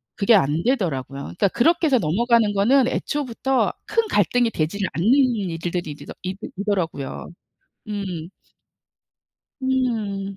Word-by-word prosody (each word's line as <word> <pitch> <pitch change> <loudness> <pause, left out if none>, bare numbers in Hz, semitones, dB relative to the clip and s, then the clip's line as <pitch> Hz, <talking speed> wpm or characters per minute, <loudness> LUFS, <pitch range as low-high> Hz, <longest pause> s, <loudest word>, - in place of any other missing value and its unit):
그게 215 +2 +4
안 155 -2 +2
되더라고요. 140 - -1
그러니까 200 +3 0
그렇게 325 - +2
해서 265 -3 +4
넘어가는 220 +5 +2
거는 245 +6 +4
애초부터 265 -2 -1
큰 455 -1 0
갈등이 245 - +2
되질 160 +6 -2
않는 170 +7 -1 0.3
일들이 175 -2 -3
일이더 145 - -9
이 185 +1 -3 0.2
이더라고요. 185 -9 -2 0.6
음. 185 -6 -4 1.3
음. 220 -7 -1
200 Hz, 285 characters per minute, -22 LUFS, 175-245 Hz, 1.3 s, 그게